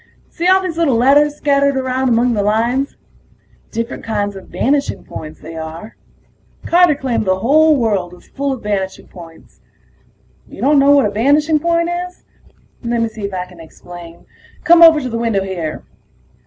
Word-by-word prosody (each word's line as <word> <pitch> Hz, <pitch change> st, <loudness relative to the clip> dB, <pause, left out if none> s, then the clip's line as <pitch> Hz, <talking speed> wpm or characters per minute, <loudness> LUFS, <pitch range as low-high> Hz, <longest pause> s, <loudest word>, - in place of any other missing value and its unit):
See 345 Hz, +1 st, -2 dB
all 380 Hz, +1 st, +4 dB
those 335 Hz, -3 st, -4 dB
little 295 Hz, -7 st, +2 dB
letters 285 Hz, +5 st, +3 dB
scattered 280 Hz, -1 st, +1 dB
around 260 Hz, 0 st, -1 dB
among 240 Hz, +1 st, +2 dB
the 210 Hz, -, 0 dB
lines? 235 Hz, +6 st, 0 dB, 0.7 s
Different 230 Hz, +1 st, -5 dB
kinds 205 Hz, -2 st, -3 dB
of 195 Hz, -, -11 dB
vanishing 280 Hz, +2 st, -1 dB
points, 155 Hz, 0 st, -9 dB
they 165 Hz, +1 st, -10 dB
are. 160 Hz, +6 st, -8 dB, 0.7 s
Carter 345 Hz, -3 st, +4 dB
claimed 260 Hz, -6 st, -2 dB
the 185 Hz, 0 st, +1 dB
whole 310 Hz, +5 st, +4 dB
world 205 Hz, -7 st, -1 dB
was 180 Hz, -, -17 dB
full 280 Hz, 0 st, -3 dB
of 260 Hz, -4 st, -6 dB
vanishing 195 Hz, -2 st, -3 dB
points. 165 Hz, -3 st, -15 dB, 0.9 s
You -, -, -13 dB
don't 290 Hz, +1 st, +3 dB
know 275 Hz, +1 st, +4 dB
what 280 Hz, -5 st, +4 dB
a 205 Hz, -, -1 dB
vanishing 295 Hz, +8 st, +2 dB
point 335 Hz, +2 st, 0 dB, 0.2 s
is? 360 Hz, -, -21 dB, 0.6 s
Lemme 235 Hz, -1 st, -1 dB
see 215 Hz, -2 st, -7 dB
if 200 Hz, -, -6 dB
I 180 Hz, 0 st, -3 dB
can 180 Hz, -2 st, -17 dB
explain. 170 Hz, +1 st, -13 dB, 0.4 s
Come 340 Hz, 0 st, +5 dB
over 325 Hz, -2 st, +8 dB
to 260 Hz, -, -5 dB
the 230 Hz, -2 st, -4 dB
window 225 Hz, -4 st, 0 dB
here. 175 Hz, -5 st, -5 dB
235 Hz, 170 wpm, -16 LUFS, 195-290 Hz, 0.9 s, over